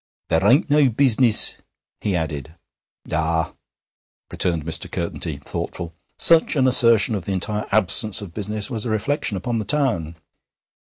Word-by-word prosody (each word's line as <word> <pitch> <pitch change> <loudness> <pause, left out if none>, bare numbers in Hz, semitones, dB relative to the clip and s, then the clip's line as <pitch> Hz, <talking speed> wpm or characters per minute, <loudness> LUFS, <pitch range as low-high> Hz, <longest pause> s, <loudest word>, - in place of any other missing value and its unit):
'There 80 +4 +1
ain't 135 - +3
no 145 -2 +3
business!' 120 -2 +4 0.4
he 100 -3 -2
added. 80 -2 -5 0.6
'Ah!' 80 +1 -1 0.8
returned 85 -4 -1
Mr. 80 +1 -2
Curtenty, 85 -3 -4
thoughtful: 85 +3 -7 0.2
such 165 -1 +4
an 130 -2 +2
assertion 115 -4 +3
of 95 -5 -4
the 100 - -3
entire 105 +3 -3
absence 105 +1 +3
of 100 -5 -9
business 105 +1 -3
was 110 -3 -3
a 120 - -4
reflection 110 +1 -2
upon 115 +5 -3
the - - -3
town. 105 - -2
105 Hz, 145 wpm, -20 LUFS, 85-120 Hz, 0.8 s, business